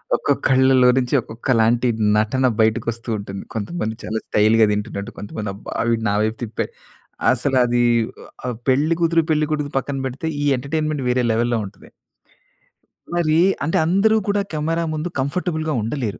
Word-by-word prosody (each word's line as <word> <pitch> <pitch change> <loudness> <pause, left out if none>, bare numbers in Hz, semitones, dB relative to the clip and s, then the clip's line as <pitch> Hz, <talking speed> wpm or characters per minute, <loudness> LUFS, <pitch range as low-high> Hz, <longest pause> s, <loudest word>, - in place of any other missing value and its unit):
ఒక్కక్కళ్ళలో 130 -1 +3
నుంచి, 125 +1 0
ఒక్కొక్కలాంటి 115 +1 +1 0.3
నటన 130 +5 +2
బయటకొస్తూ 115 +1 0
ఉంటుంది. 100 -1 -7
కొంతమంది 110 0 -3
చాలా 110 0 -2
స్టైల్‌గా 110 +1 +4
దింటున్నట్టు. 105 +1 -3
కొంతమంది 105 0 -5
అబ్బా! 100 - -8 0.2
వీడు 115 -1 0
నా 100 - +1
వైపు 110 +1 -1
తిప్పాడు. 110 -2 -4 0.6
అసలది 125 -2 +2 0.4
ఒ - - -12 0.2
ఆహ్, 125 -2 -2
పెళ్ళి 145 +5 +3
కూతురు, 165 0 +3
పెళ్ళికొడుకు 150 -1 0
పక్కన 135 +1 -2
పెడితే, 140 +5 -4
ఈ - - 0
ఎంటర్టైన్మెంట్ 150 +1 -2
వేరే 125 0 +2
లెవెల్‌లో 120 +1 +1
ఉంటది. 95 0 -13 1.2
మరీ 160 -2 +2 0.2
అంటే 165 +6 0
అందరూ 200 +6 +3
కూడా, 205 0 +1
కెమెరా 165 +2 -1
ముందు 155 +3 -3
కంఫర్టబుల్‌గా 155 +2 -1
ఉండలేరు. 115 -2 -3
130 Hz, 135 wpm, -21 LUFS, 110-155 Hz, 1.2 s, స్టైల్‌గా